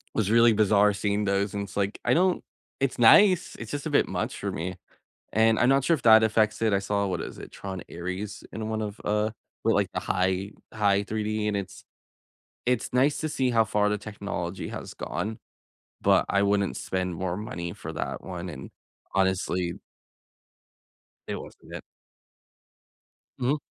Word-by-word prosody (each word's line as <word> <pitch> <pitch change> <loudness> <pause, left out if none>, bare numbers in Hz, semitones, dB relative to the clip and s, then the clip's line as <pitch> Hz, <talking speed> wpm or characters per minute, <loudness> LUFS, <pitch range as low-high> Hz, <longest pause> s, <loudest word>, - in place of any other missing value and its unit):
Was 105 -2 +1
really 115 0 +6
bizarre 105 -1 +4
seeing 105 +1 0
those, 100 0 0
and 100 0 -2
it's 100 0 -9
like, 100 0 -1
I - - +4
don't 185 +2 +2 0.4
it's 135 -1 0
nice, 185 - +6
it's 115 -2 -7
just 145 -1 -4
a - - -1
bit 145 - +3
much - - -3
for - - -3
me. 90 +2 -4 0.5
And 110 0 +4
I'm 120 - +4
not 135 0 +4
sure 170 - +3
if 155 - 0
that 110 -1 +8
affects 110 -1 +2
it. 110 -2 +2
I 100 - +3
saw 100 0 0
what 90 -2 -2
is - - -7
it? - - -10
Tron: 95 -2 -6
Ares 95 +4 -5
in 110 0 -4
one 110 0 -2
of, 105 0 -5
uh, 105 +1 +1 0.3
well, - - +3
like, - - +1
the - - -1
high 95 +2 0 0.2
high 100 -2 +2
3D, 110 0 -2
and 105 - 0
it's 100 -2 -6 0.8
it's 125 -2 0
nice 135 +3 +3
to 155 - -2
see 130 -3 0
how 115 -2 +4
far 105 -1 +1
the 105 - 0
technology 100 -4 -5
has - - -7
gone, 110 +1 -4 0.6
but - - +4
I 100 +1 +2
wouldn't 100 -1 +1
spend 90 -1 -2
more 90 +1 -2
money 85 -5 -5
for - - -7
that - - -4
one, 90 -1 -6
and, 70 -5 -8 0.4
honestly 95 -2 +1 1.6
it - - -2
wasn't - - -10
it. - - -5 1.6
Mhm. 130 +4 +1
105 Hz, 180 wpm, -27 LUFS, 95-110 Hz, 1.6 s, that